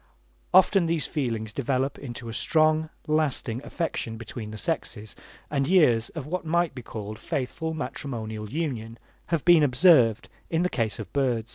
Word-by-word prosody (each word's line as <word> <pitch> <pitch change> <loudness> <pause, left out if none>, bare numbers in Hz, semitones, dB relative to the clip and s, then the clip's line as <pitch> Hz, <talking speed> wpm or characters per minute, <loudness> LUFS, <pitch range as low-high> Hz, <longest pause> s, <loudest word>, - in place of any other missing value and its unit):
Often 185 -1 +5
these 165 -3 0
feelings 115 -7 -3
develop 135 +1 -1
into 120 -3 -7
a 115 - -5
strong, 155 +3 +2 0.2
lasting 145 -6 0
affection 140 -9 -3
between 115 -1 -7
the 110 - -7
sexes, 110 -6 -3 0.4
and 140 -2 +1
years 125 -11 +4
of 155 -5 -4
what 180 +5 -3
might 170 0 +1
be 130 - -7
called 110 -2 -7
faithful 160 +5 -3
matrimonial 110 -6 -5
union 120 -6 -3 0.3
have 165 -4 -1
been 175 -2 +7
observed 125 - +5 0.2
in 165 +1 +1
the 180 - +1
case 110 - -1
of 110 - -8
birds. 120 -5 0
135 Hz, 155 wpm, -26 LUFS, 115-160 Hz, 0.4 s, been